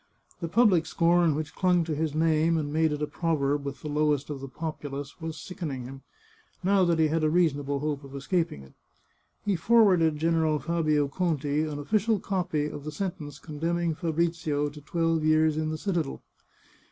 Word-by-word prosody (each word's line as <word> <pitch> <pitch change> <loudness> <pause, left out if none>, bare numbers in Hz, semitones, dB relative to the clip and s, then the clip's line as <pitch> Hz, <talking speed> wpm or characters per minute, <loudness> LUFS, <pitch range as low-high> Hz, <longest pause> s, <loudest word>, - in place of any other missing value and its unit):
The 170 - -3
public 180 -4 +4
scorn 170 -2 +3
which 155 0 -4
clung 180 -2 +2
to 160 -1 -3
his 155 0 -2
name 160 +1 +2
and 145 -2 -2
made 160 0 +2
it 150 0 -2
a - - +2
proverb 145 -3 0
with 140 -1 -6
the - - -4
lowest 150 -1 0
of 140 - -5
the 135 - -6
populace, 145 0 -6
was 160 -1 -5
sickening 150 -8 -5
him, 135 +2 -9 0.6
now 195 +1 +4
that 170 -1 +2
he 160 -1 +3
had 160 +1 0
a 155 - +3
reasonable 145 -4 +1
hope 150 -1 -2
of 140 0 -10
escaping 140 - -1
it. 65 - -17 0.7
He 205 -2 +2
forwarded 180 -5 +4
General 160 -1 +2
Fabio 155 -2 +1
Conti 150 -2 0
an 150 -2 -4
official 210 +8 +1
copy 180 -7 -1
of 145 -1 -6
the 155 - -5
sentence 150 -4 -5
condemning 165 +3 -2
Fabrizio 160 -3 -1
to 150 +1 -12
twelve 165 +1 0
years 155 0 +3
in 155 0 -1
the 155 - -3
citadel. 170 -5 -2
155 Hz, 180 wpm, -27 LUFS, 145-170 Hz, 0.7 s, public